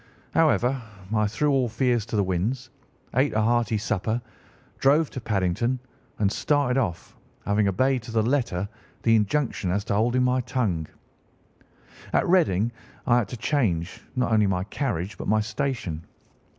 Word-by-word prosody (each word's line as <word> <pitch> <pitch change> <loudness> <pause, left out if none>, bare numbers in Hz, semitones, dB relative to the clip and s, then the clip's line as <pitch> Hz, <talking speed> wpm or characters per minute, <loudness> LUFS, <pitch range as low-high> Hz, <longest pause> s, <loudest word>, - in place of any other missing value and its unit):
However, 135 -5 +3 0.3
I 105 -1 +3
threw 145 +8 +1
all 130 -3 +2
fears 120 -1 +1
to 115 - -4
the 105 - +3
winds, 110 +8 -2 0.4
ate 130 +4 +2
a - - +3
hearty 115 -1 +2
supper, 110 +2 -1 0.6
drove 145 +3 +3
to 130 - -6
Paddington, 110 +4 0 0.4
and 100 -2 +2
started 140 0 +1
off, 85 -9 -3 0.3
having 105 0 +2
obeyed 130 +7 +2
to 115 +1 -9
the 110 -1 +2
letter 115 -7 0 0.4
the 115 -1 +5
injunction 110 -2 0
as 100 +3 0
to 105 - -1
holding 120 +5 +2
my 125 0 +2
tongue. 105 -11 -1 1.3
"At - - +3
Reading 120 - +3 0.3
I 120 0 +4
had 110 - -1
to 125 - -7
change 105 - 0
not 125 -2 0
only 105 -2 +4
my 90 -1 0
carriage 105 - -3
but - - -5
my 110 +1 +3
station. 110 - -2
115 Hz, 155 wpm, -25 LUFS, 100-130 Hz, 1.3 s, the